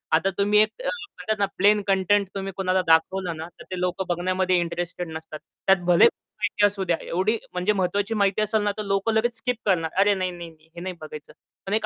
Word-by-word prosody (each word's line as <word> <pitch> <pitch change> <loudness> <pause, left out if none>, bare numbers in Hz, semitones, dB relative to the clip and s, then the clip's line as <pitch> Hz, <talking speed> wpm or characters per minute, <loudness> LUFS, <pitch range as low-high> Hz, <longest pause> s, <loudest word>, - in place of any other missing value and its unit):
आता 185 +4 +2
तुम्ही 205 +1 +3
एक 215 0 +4
अ, - - -3
म्हणतात 400 - -4
ना, 200 - +3
प्लेन 205 +2 +4
कंटेंट 195 +1 +2
तुम्ही 195 0 -4
कुणाला 185 -1 +1
दाखवलं 170 +2 +2
ना, 160 +1 -6
तर - - -10
ते 185 - -3
लोकं 180 +1 -1
बघण्यामध्ये 185 +1 +1
इंटरेस्टेड 175 +1 -3
नसतात. 160 -1 -8 0.3
त्यात 195 -1 +5
भले 175 -1 +6
माहिती 205 0 0
असू 200 -1 0
द्या. 170 -3 +1
एवढी 190 +6 0 0.2
म्हणजे 180 +4 +1
महत्त्वाची 200 +3 0
माहिती 200 -1 +1
असेल 215 0 +1
ना, 205 - +1
तर 215 - -3
लोकं 195 +2 0
लगेच 230 +2 +1
स्किप 250 +2 -1
करणार. 175 -5 +2
"अरे, 205 +1 +5
नाही, 185 -2 -2
नाही, 175 -1 -8
नाही, 160 0 -23
हे 170 - -7
नाही 185 0 -5
बघायचं." 155 -1 -9 0.3
पण 195 - -3
एक 215 0 +1
190 Hz, 220 wpm, -24 LUFS, 175-205 Hz, 0.3 s, भले